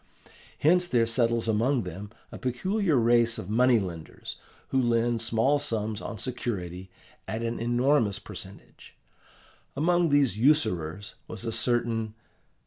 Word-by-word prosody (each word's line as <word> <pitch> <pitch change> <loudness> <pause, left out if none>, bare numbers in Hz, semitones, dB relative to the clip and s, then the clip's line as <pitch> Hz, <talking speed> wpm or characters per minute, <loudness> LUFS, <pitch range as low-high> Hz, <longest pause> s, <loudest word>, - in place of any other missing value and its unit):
Hence 180 +4 +3
there 120 -7 +2
settles 115 0 +1
among 115 +3 +1
them 95 +4 -7 0.2
a - - -8
peculiar 185 - 0
race 120 -1 +3
of 95 - -6
money 125 +2 +4
lenders 85 -6 -6 0.3
who 135 - +2
lend 120 -1 +1
small 115 +6 +2
sums 110 -4 -1
on 115 - -6
security 95 -7 -5 0.4
at 110 +1 -3
an 115 0 -2
enormous 120 -2 +2
percentage. - - -11 0.8
Among 175 +3 +2
these 140 -8 +2
usurers 100 - +1
was 115 +1 -7
a 115 - -1
certain... 115 -2 0
115 Hz, 130 wpm, -27 LUFS, 110-130 Hz, 0.8 s, money